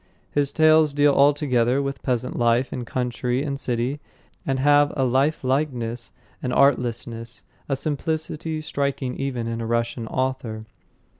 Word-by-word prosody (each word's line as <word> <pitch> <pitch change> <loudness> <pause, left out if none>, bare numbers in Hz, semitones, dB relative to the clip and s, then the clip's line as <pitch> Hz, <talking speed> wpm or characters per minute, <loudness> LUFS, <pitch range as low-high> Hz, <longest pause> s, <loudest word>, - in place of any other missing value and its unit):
His 145 -1 +1
tales 155 -2 +4
deal 145 0 +4
altogether 140 -3 +3
with 140 0 -3
peasant 125 -1 -1
life 120 +2 +2
in 125 -2 -4
country 125 +1 -1
and 140 -2 -3
city, 125 +3 -2 0.5
and 135 -1 +1
have 145 +1 +4
a 135 - +2
lifelikeness, 130 -3 0 0.3
an 125 - -2
artlessness, 120 -4 0 0.3
a 135 - +1
simplicity 155 +2 -3
striking 140 -3 -2
even 130 -4 -3
in 115 0 -3
a 115 - -3
Russian 115 0 -1
author. 125 -4 -3
130 Hz, 135 wpm, -23 LUFS, 120-145 Hz, 0.5 s, tales